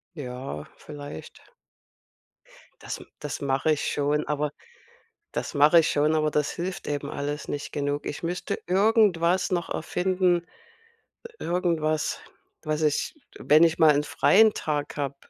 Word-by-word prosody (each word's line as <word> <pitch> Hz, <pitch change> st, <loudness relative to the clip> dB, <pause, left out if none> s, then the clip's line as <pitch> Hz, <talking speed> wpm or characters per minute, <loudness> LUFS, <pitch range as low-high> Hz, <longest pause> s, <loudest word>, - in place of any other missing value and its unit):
Ja, 125 Hz, -, -6 dB
vielleicht. 145 Hz, -1 st, -10 dB, 1.4 s
Das -, -, -5 dB
m -, -, -12 dB
das 150 Hz, -, -5 dB
mache 140 Hz, +2 st, +1 dB
ich 150 Hz, -, -2 dB
schon, 145 Hz, +1 st, 0 dB
aber 150 Hz, 0 st, -1 dB, 0.8 s
das -, -, -4 dB
mache 150 Hz, +4 st, +6 dB
ich 160 Hz, -, +4 dB
schon, 150 Hz, +2 st, +2 dB
aber 155 Hz, -1 st, +1 dB
das 150 Hz, -1 st, +1 dB
hilft 180 Hz, +2 st, -5 dB
eben 145 Hz, -1 st, -3 dB
alles 145 Hz, +1 st, -4 dB
nicht 145 Hz, -, -5 dB
genug. 145 Hz, 0 st, -2 dB
Ich 145 Hz, -, -5 dB
müsste 175 Hz, +2 st, -3 dB
irgendwas 190 Hz, -2 st, +3 dB
noch 175 Hz, -2 st, -1 dB
erfinden 180 Hz, +1 st, 0 dB, 1.0 s
irgendwas, 165 Hz, -3 st, -1 dB, 0.4 s
was 155 Hz, 0 st, -1 dB
ich, 150 Hz, -2 st, 0 dB, 0.2 s
wenn 155 Hz, +3 st, +5 dB
ich 165 Hz, 0 st, +3 dB
mal 155 Hz, -2 st, +6 dB
'n 145 Hz, -, +1 dB
freien 215 Hz, +7 st, +4 dB
Tag 150 Hz, -2 st, -3 dB
habe 140 Hz, -1 st, -3 dB
150 Hz, 135 wpm, -26 LUFS, 145-175 Hz, 1.4 s, mache